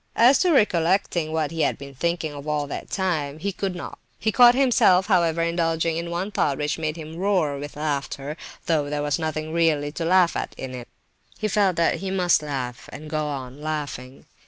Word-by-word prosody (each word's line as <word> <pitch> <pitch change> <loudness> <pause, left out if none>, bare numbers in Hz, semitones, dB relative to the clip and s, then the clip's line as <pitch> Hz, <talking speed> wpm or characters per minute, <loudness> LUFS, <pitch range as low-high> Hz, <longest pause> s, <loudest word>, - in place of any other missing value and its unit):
As 250 +4 +6
to 360 - +3
recollecting 175 - +2
what 160 -2 -1
he 165 -1 -2
had - - +1
been 140 -1 -10
thinking 165 +2 -2
of 145 +1 -9
all 150 -1 0
that 140 - -6
time, 155 -7 -1
he 200 +6 -2
could 190 -1 -3
not. 175 - -7 0.2
He 220 - 0
caught 240 +2 +7
himself, 230 -8 +4
however, 170 -4 +2
indulging 165 -1 0
in 170 +1 -3
one 180 +4 -3
thought 140 -8 0
which 150 +2 -2
made 155 -1 -2
him 160 0 -8
roar 180 -7 +1
with 145 0 -7
laughter, 145 -1 -3 0.3
though 155 -3 +1
there 145 0 -2
was 145 +2 0
nothing 155 0 -3
really 155 -3 +2
to 165 - -4
laugh 180 0 +4
at - - -4
in 130 -1 -6
it; 125 -1 -7 0.5
but - - -26
he 215 - +1
felt 200 -3 +2
that 170 0 +2
he 195 - -4
must 180 -4 +3
laugh, 130 -5 -5
and 150 +1 -9
go 155 -1 -1
on 135 -1 -6
laughing. 145 -4 -5
160 Hz, 205 wpm, -24 LUFS, 145-180 Hz, 0.5 s, caught